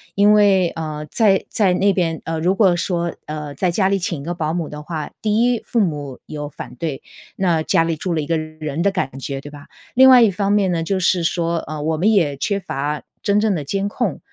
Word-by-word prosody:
因 205 +1 +5
为， 200 -3 +4
呃， 155 -2 -5
在 200 -2 +2
在 200 -4 +2
那 195 +2 +2
边 165 -4 -1
呃， 165 0 -2
如 180 +3 +2
果 195 -3 +4
说， 170 0 -2
呃， 150 -1 -6
在 180 -2 0
家 190 +2 +2
里 195 +1 +2
请 170 -3 -3
一 - - -9
个 175 - -2
保 160 -2 -2
姆 170 -2 -2
的 150 0 -8
话， 155 -1 -5
第 215 +1 +1
一， 245 -2 +1
父 235 - 0
母 145 - -2
有 150 -1 -6
反 130 - -9
对， 140 +1 -4 0.4
那 170 -4 +1
家 165 - +2
里 165 -1 -1
住 175 +3 -3
了 160 - 0
一 150 - -2
个 165 - +1
人 155 -1 -5
的 200 +2 +2
感 135 -9 -3
觉， 135 0 -5
对 145 - -10
吧？ 145 -1 -12 0.3
另 265 +1 +8
外 255 -2 +8
一 225 - +6
方 200 +1 -1
面 205 -2 +3
呢， 165 -1 -1
就 190 +3 -1
是 180 -1 +2
说， 170 0 0
呃， 155 0 -6
我 160 +2 0
们 185 +8 +2
也 165 -9 +2
缺 200 +8 -1
乏 145 -4 -3 0.2
真 200 0 +2
正 210 -2 +1
的 155 - -3
监 195 +8 -2
控， 205 - -2
170 Hz, 260 characters per minute, -20 LUFS, 155-195 Hz, 0.4 s, 另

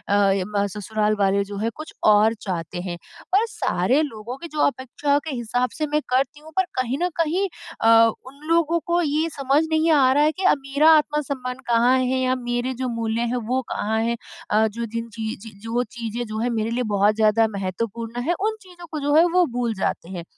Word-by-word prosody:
अ, 200 0 +2
ससुराल 210 +1 0
वाले 200 0 +2
जो 200 - -5
हैं 220 +3 -1
कुछ 310 +1 -9 0.2
और 215 +2 +4
चाहते 175 -1 -4
हैं, 175 -2 -5 0.4
पर 425 +4 +4
सारे 265 - +1
लोगों 235 -1 -6
की 335 - -8
जो 295 - +1
अपेक्षाओं 280 +2 -1
के 285 - -3
हिसाब 245 +1 -1
से 305 -1 -1
मैं 300 +1 0
करती 270 +3 0
हूँ 315 +1 -13
पर 375 - +4 0.2
कहीं 255 +2 -2
न 360 - +2
कहीं 355 +5 +1 0.3
अ, 225 - +4 0.4
उन 275 +2 -13
लोगों 335 0 +3
को 345 +1 +2
ये 310 +1 0
समझ 275 +3 +2
नहीं 320 +1 +2
आ 260 0 +5
रहा 290 +2 +4
है 305 - +4
कि 380 - -6
अब - - +5
मेरा 295 +4 +5
आत्मसम्मान 280 -4 -2
कहाँ 240 +2 +4
है? 255 0 0
या 255 0 +1
मेरे 245 +1 -2
जो 250 - -1
मूल्य 225 +1 -1
हैं 245 -2 -2
वो 260 - +2
कहाँ 220 +2 -1
है? 235 +1 -1 0.3
अ, 220 +1 +4
जो 230 +2 -4
जिन 230 +1 -5
चीज़ 225 -1 -5
चीज़ 215 -3 -12
जो 235 +2 0
चीज़ें 235 +1 -3
जो 215 0 -5
हैं 245 +2 0
मेरे 225 -1 -1
लिए 240 - -2
बहुत 205 +1 +2
ज़्यादा 220 +1 +3
महत्वपूर्ण 230 +5 -4
हैं 345 +5 +1
उन 440 0 0
चीज़ों 355 -2 -13
को 310 - -3
जो 290 +1 0
है 325 - +7
वो 360 0 +4
भूल 240 -2 -1
जाते 185 -2 -2
हैं, 175 -3 -6
245 Hz, 215 wpm, -23 LUFS, 220-295 Hz, 0.4 s, है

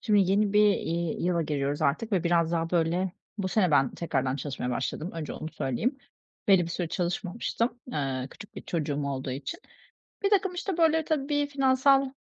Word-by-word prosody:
Şimdi 205 -4 +3
yeni 200 +1 +2
bir, 210 0 +6
iii, 170 -1 -2
yıla 175 -1 +2
giriyoruz 145 -2 -1
artık 215 +11 0
ve 185 -3 +2
biraz 170 -1 +2
daha 165 0 0
böyle 175 +2 +1 0.3
bu 190 -2 -1
sene 185 -2 +2
ben 135 -3 +4
tekrardan 135 -5 -1
çalışmaya 135 -2 -4
başladım, 155 +7 -2
önce 165 -2 -5
onu 155 - -5
söyleyeyim. 190 - -1 0.5
Belli 190 -3 +6
bir 170 - -4
süre 175 0 -2
çalışmamıştım. 195 +7 -2
Iıı, 135 -2 -2
küçük 205 - -13
bir - - -7
çocuğum 145 -4 -2
olduğu 135 -1 -3
için. 135 - -5 0.6
Birtakım, 395 -2 +3
işte, 355 0 -3
böyle, 320 -1 +3
tabii 290 -1 0
finansal 270 0 +3
175 Hz, 170 wpm, -28 LUFS, 150-235 Hz, 0.6 s, bir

